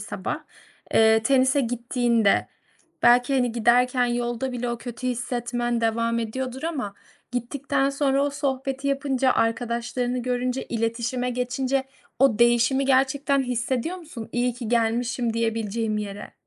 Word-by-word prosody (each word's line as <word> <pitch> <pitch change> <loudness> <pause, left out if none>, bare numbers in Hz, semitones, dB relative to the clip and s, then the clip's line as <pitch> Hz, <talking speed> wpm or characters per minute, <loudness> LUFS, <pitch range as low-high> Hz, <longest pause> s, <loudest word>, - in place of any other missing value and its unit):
sabah, - - -4 0.6
eee, 220 0 +5
tenise 260 +2 +3
gittiğinde 235 -3 +1 0.5
belki, 245 +3 +5
hani, 245 -3 +1
giderken 245 +2 +3
yolda 240 +1 -2
bile 245 0 -3
o 235 - -3
kötü 245 +1 -6
hissetmen 240 -1 -2
devam 230 +1 +1
ediyordur 255 +4 -4
ama 270 -12 -3 0.4
gittikten 270 +3 -1
sonra 275 0 +1
o 285 - 0
sohbeti 270 0 -2
yapınca, 270 -2 +1
arkadaşlarını 240 +2 -1
görünce, 250 +1 -1
iletişime 235 +2 -1
geçince 255 +2 -1 0.3
o 255 -5 +4
değişimi 240 +3 +4
gerçekten 275 +1 +2
hissediyor 250 +6 -2
musun? 300 -10 -9
İyi 245 0 0
ki 240 -3 -6
gelmişim 235 +1 0
diyebileceğim 225 -1 -1
yere. 205 0 -6
245 Hz, 125 wpm, -24 LUFS, 230-265 Hz, 0.6 s, eee